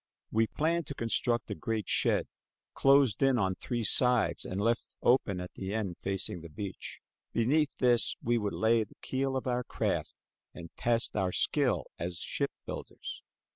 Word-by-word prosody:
We 110 0 +3
planned 165 +3 0
to 140 - -5
construct 115 0 +1
a - - +1
great 110 -2 -3
shed, - - +2 0.5
closed 135 -5 +4
in 135 -2 +4
on 95 -4 +1
three 120 +4 -3
sides 115 -7 +3
and 95 - -3
left 115 +3 -1
open 105 -7 +3
at 90 0 -7
the 95 +2 -4
end 100 -6 -2
facing 95 -3 -2
the 85 - -10
beach. 95 +5 -7 0.3
Beneath 140 +6 +2
this 120 -2 +3
we 120 0 +1
would 105 -2 -2
lay 110 0 +3
the 105 - -16
keel 135 0 -1
of 130 - -4
our 125 -1 0
craft - - -2 0.4
and 85 -1 -9
test 115 -1 0
our 95 -3 +1
skill - - +1 0.2
as 85 +1 -3
ship - - -1 0.2
builders. - - -7
115 Hz, 170 wpm, -31 LUFS, 95-125 Hz, 0.5 s, closed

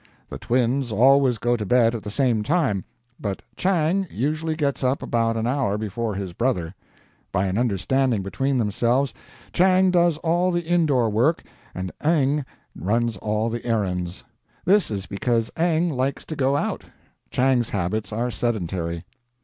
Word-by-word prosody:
The - - -7
Twins 125 +1 0
always 130 +2 +4
go 120 +3 +1
to 110 - -3
bed 115 +2 +3
at 115 - -4
the 105 - -6
same 120 -1 +1
time; 110 - 0 0.3
but 100 -3 -4
Chang 185 +1 +1
usually 155 +5 -1
gets 140 -4 -1
up 130 +2 +1
about 115 -1 0
an 110 - -1
hour 125 -5 0
before 110 +1 -3
his 95 -3 -5
brother. 90 -7 -1 0.6
By 95 - +1
an 95 0 -1
understanding 120 +1 +1
between 135 +7 -1
themselves, 120 +5 +1 0.4
Chang 185 +1 +4
does 175 -3 +3
all 175 +2 +2
the 175 0 -1
indoor 155 -8 +2
work 125 +10 +2 0.3
and 90 0 -4
Eng 150 -2 +2 0.3
runs 115 +6 0
all 110 +3 -1
the 120 0 -4
errands. 90 -6 -2 0.4
This 200 +1 +4
is 100 -3 -3
because 115 +3 -1
Eng 170 0 +1
likes 135 0 -2
to 155 - -5
go 135 0 +1
out; - - -2 0.5
Chang's 125 -2 +2
habits 100 +2 -2
are 120 +3 -1
sedentary. 90 -8 -2
120 Hz, 155 wpm, -23 LUFS, 105-145 Hz, 0.6 s, always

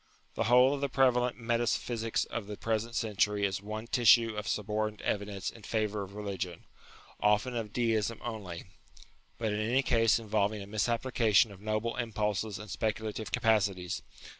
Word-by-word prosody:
The - - -1
whole 125 +4 +6
of 140 - -3
the 140 - 0
prevalent 125 -2 +2
meta 120 0 0
physics 115 0 -1
of 110 -4 -5
the 105 -1 -6
present 115 +1 -2
century 105 -1 +1
is 95 0 -2
one 110 +2 -5
tissue 115 -2 +5
of 105 -2 -4
suborned 105 0 -1
evidence 100 -1 -2
in 115 - -14
favour 105 -1 -1
of 100 0 -8
religion; 95 -4 -4 0.6
often 105 +4 +2
of 110 -3 -3
Deism 115 -1 0
only, 105 -8 -5 0.7
but 110 -2 -1
in 105 - -1
any 120 +5 +2
case 115 -3 +3
involving 105 -2 -1
a - - -9
misapplica 115 +1 0
tion 105 +2 +6
of 100 -1 -13
noble 110 +2 -1
impulses 105 -3 -1
and 105 +2 -9
speculative 110 0 -3
capacities. 105 -6 +1
110 Hz, 165 wpm, -31 LUFS, 105-115 Hz, 0.7 s, whole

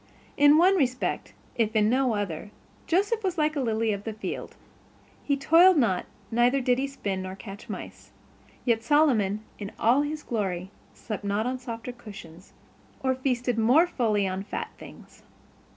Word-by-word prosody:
In 290 +1 +6
one 375 +4 +5
respect, 255 -5 -1 0.2
if 225 -2 0
in 210 -1 +4
no 250 0 +2
other, 205 -2 -4 0.4
Joseph 405 +6 +1
was 370 -2 -1
like 310 0 +1
a - - -1
lily 225 -2 0
of 200 0 -5
the 220 - -4
field. 215 - -6 0.7
He 280 -1 0
toiled 335 +6 +6
not 205 -10 +1 0.2
neither 240 +4 +3
did 250 -1 +1
he 275 - 0
spin 200 -9 -4
or 185 0 -6
catch 195 0 -10
mice. - - -8 0.6
Yet 230 -3 +2
Solomon 225 -7 +2 0.2
in 205 0 -6
all 245 +5 +4
his 300 +1 -4
glory 190 -5 -3 0.2
slept 215 -2 -6
not 205 +2 0
on 255 +1 -2
softer 235 0 -6
cushions, 195 -7 -12 0.5
or 260 -1 +2
feasted 250 -2 -1
more 255 +10 +5
fully 215 - 0
on 190 0 -3
fat 200 - -5
things. - - -14
240 Hz, 165 wpm, -26 LUFS, 205-280 Hz, 0.7 s, In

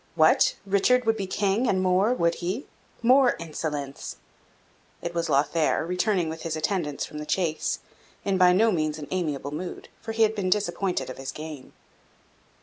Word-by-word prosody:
What! 155 -1 +5
Richard 200 +6 +3
would 225 0 +3
be 195 -3 -3
King, 200 +5 +1
and 190 - +2
more, 185 +4 +3
would 170 -9 +2
he? 190 +10 -2 0.4
More 255 +1 +5
insolence!" 150 -4 -5 0.8
It 170 - -5
was 170 -1 -1
Lothaire, 155 +3 +2
returning 180 0 +1
with 160 0 -5
his 165 -1 -3
attendants 155 -2 -1
from 150 - -8
the 150 - -5
chase, 165 -4 -1 0.4
in 195 -1 +1
by 180 -1 +7
no 220 +5 +4
means 155 -4 0
an 150 -2 -7
amiable 150 -6 -2
mood, 175 +4 -6
for 225 -1 -5
he 225 0 +3
had 220 0 +3
been 200 -4 -1
disappointed 180 -7 0
of 130 - -10
his 135 - -4
game. 155 -3 -9
180 Hz, 170 wpm, -26 LUFS, 155-200 Hz, 0.8 s, by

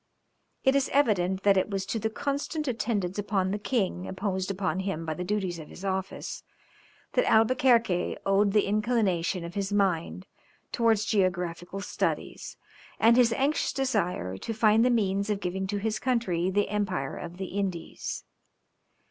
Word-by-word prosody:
It 265 0 +4
is 275 -1 +2
evident 195 -9 +2
that 200 -1 +5
it 190 - +1
was 195 -2 -2
to 225 +3 -2
the 220 - -1
constant 285 +5 -3
attendance 210 -6 -1
upon 195 -2 0
the 205 - -2
king 200 -5 -1
imposed 190 -1 -2
upon 190 -1 -1
him 190 -4 -3
by 160 - -2
the 180 - -4
duties 185 -3 -2
of 155 - -9
his 195 - -10
office, 190 0 -3 0.7
that - - +2
Albuquerque 230 -4 +3
owed 195 +1 +3
the 210 0 +3
inclination 200 -5 +1
of 170 - -7
his 200 0 -2
mind 190 -2 0 0.5
towards 225 -3 +2
geographical 180 -2 -1
studies, - - -3 0.4
and 230 +1 +6
his 240 -2 +5
anxious 280 +5 +1
desire 180 - -1
to 225 - -5
find 220 0 +4
the 250 - +4
means 200 -3 +1
of 205 -2 0
giving 190 0 -3
to 205 +1 -2
his 215 +1 -1
country 190 -9 0
the 205 +2 +1
Empire 190 -9 -1
of 175 0 -7
the 190 -1 -5
Indies. 190 -4 -3
200 Hz, 160 wpm, -28 LUFS, 185-225 Hz, 0.7 s, and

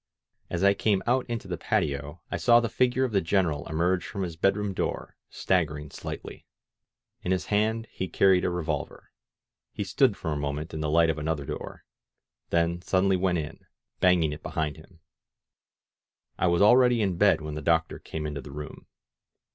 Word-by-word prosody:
As 90 +2 -2
I 100 0 +6
came 100 -1 +1
out 125 +1 +1
into 115 -4 -4
the 90 -3 -4
patio, 75 +4 -2
I - - -1
saw 120 -1 +5
the 115 -1 -1
figure 125 +4 +1
of 130 - 0
the 100 -2 +2
Greneral 80 -5 0
emerge 85 +3 +1
from 100 - -4
his 85 -3 -4
bed 95 +4 +2
room 105 -1 -2
door, - - -3
staggering 75 -5 -1
slightly. - - -8 0.7
In 90 - -2
his 95 - 0
hand 110 +2 +1
he 95 - -4
carried 95 +1 +3
a - - +1
revolver. 80 -4 -4 0.6
He 105 - -4
stood 115 +3 +2
for 80 - -4
a - - -2
moment 75 +3 -4
in 80 - -4
the 75 -1 -1
light 80 +1 +4
of 80 - -5
another 75 -2 -2
door, - - -7 0.7
then 85 +1 +1
suddenly 95 +1 +2
went 90 -1 +1
in, 80 0 -7 0.3
banging 85 -5 +3
it 75 - -9
be - - -6
hind 75 -1 -2
him. 85 +1 -17 1.3
I 95 - +1
was 85 +2 +3
already 120 +1 +5
in 95 -4 -1
bed 105 +1 +4
when 75 -1 -6
the 75 - -5
doctor 80 +2 +1
came 80 -1 -6
into 75 -1 -4
the 65 - -11
room. 75 +1 -9
90 Hz, 185 wpm, -27 LUFS, 80-100 Hz, 1.3 s, I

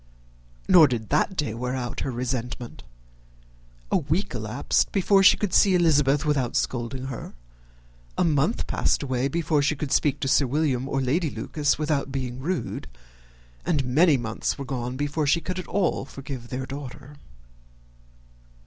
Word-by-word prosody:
Nor 165 -4 +8
did 115 -4 -3
that 155 +6 +1
day 150 -10 -1
wear 125 +2 -3
out 120 -3 -4
her - - -2
resentment. 125 -1 -4 1.1
A - - +4
week 160 +4 -1
elapsed 110 +3 0
before 195 0 +3
she 190 - +7
could 205 -4 -2
see 195 -3 +5
Elizabeth 145 -4 +3
without 135 -5 0
scolding 125 +1 -2
her: 130 - -7 0.8
a - - +3
month 155 +6 +1
passed - - 0
away 130 -1 0
before 155 0 0
she 150 +2 +1
could 140 -1 -5
speak 145 -3 +2
to 135 - -1
Sir 135 0 +3
William 135 -2 0
or 135 - 0
Lady 150 +6 0
Lucas 145 +1 -1
without 150 -3 -1
being 130 -2 -4
rude; 170 +6 -3 0.8
and 150 -6 0
many 150 +4 +4
months 115 -2 -3
were 140 - -5
gone 125 -1 -4
before 145 +1 -1
she 160 +4 +3
could 185 +3 -4
at 185 - -7
all 190 -9 0
forgive 135 -3 -8
their 130 +1 -4
daughter. 140 +1 -9
140 Hz, 160 wpm, -25 LUFS, 125-155 Hz, 1.1 s, Nor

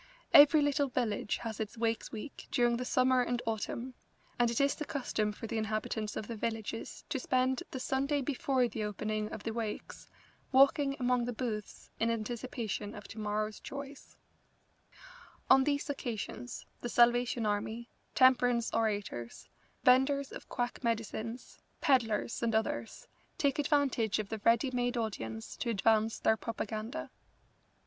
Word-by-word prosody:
Every 295 +1 +9
little 285 0 +2
village 235 -5 -1
has 225 -3 -5
its 220 +1 -4
Wakes 225 0 -1
week 225 +6 -8
during 240 -1 +2
the 250 - -3
summer 255 0 +3
and 245 0 0
autumn, 235 +3 -3 0.5
and 240 -1 +4
it 235 - -1
is 280 0 +3
the - - -5
custom 245 -7 -1
for 210 - -8
the 225 0 -2
inhabitants 215 0 -2
of 210 - -4
the 235 - -4
villages 225 0 -4
to 290 - -1
spend 255 0 +1
the 260 - -5
Sunday 275 +3 0
before 260 -2 +1
the 220 -1 -4
opening 215 +1 -2
of 205 - -7
the 225 - -3
Wakes 225 -2 -5 0.4
walking 275 +1 +5
among 250 -1 +2
the 245 - -3
booths 220 -3 -5
in 225 - +2
anticipation 230 -2 -3
of 210 - -9
tomorrow's 215 0 -3
joys. 280 0 -9 1.3
On 265 0 +7
these 285 -1 0
occasions 245 -3 -5
the 240 - -4
Salvation 240 -1 +3
Army, 220 +3 -2 0.3
temperance 245 -2 +4
orators, 205 - -2 0.3
venders 265 +2 +4
of - - -9
quack 245 +2 -3
medicines, 230 +1 -3 0.2
pedlars, 235 -7 +1
and 230 -2 +1
others, 220 - -2 0.3
take 280 0 +1
advantage 280 -7 +2
of 210 -2 -3
the 220 - -4
ready 235 +5 +3
made 245 0 0
audience 110 - -4
to 235 - -2
advance 220 +1 +2
their 220 - +2
propaganda. 225 +5 -4
235 Hz, 145 wpm, -32 LUFS, 220-260 Hz, 1.3 s, Every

